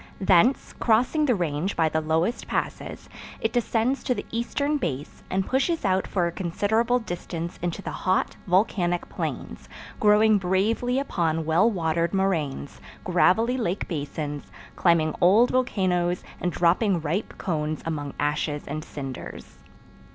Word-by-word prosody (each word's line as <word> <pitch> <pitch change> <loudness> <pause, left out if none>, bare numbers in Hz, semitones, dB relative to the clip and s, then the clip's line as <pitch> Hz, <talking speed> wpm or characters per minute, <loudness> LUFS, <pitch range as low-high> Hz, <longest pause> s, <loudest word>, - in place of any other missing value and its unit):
Thence, 195 +7 +3
crossing 250 +7 +3
the 250 - +3
range 170 +1 -1
by 165 -1 +3
the 160 0 0
lowest 160 +8 0
passes, - - -4 0.3
it - - -1
descends 240 +2 0
to 250 - +1
the - - -5
eastern 285 +6 -1
base, 145 - -4
and 190 0 0
pushes 275 +2 0
out 190 -1 +1
for 180 -3 0
a 170 - -1
considerable 210 +8 +1
distance 170 -6 -5
into 175 +3 -3
the - - -4
hot, 185 -1 0
volcanic 180 -2 +1
plains, - - -5 0.3
growing 210 0 +5
bravely 210 +7 +1
upon 165 - 0
well 170 +8 +4
watered 170 -2 0
moraines, 160 -8 -1 0.2
gravelly 205 +7 +3
lake 200 -5 -2
basins, 145 -2 -5 0.2
climbing 165 -3 +3
old 210 +8 +5
volcanoes 185 -8 0 0.2
and 180 - -1
dropping 175 +3 +2
ripe 165 +7 -3
cones 155 -4 -2
among 145 -3 -4
ashes 150 0 -1
and 155 +2 -4
cinders. 135 -5 -8
180 Hz, 135 wpm, -25 LUFS, 160-220 Hz, 0.3 s, growing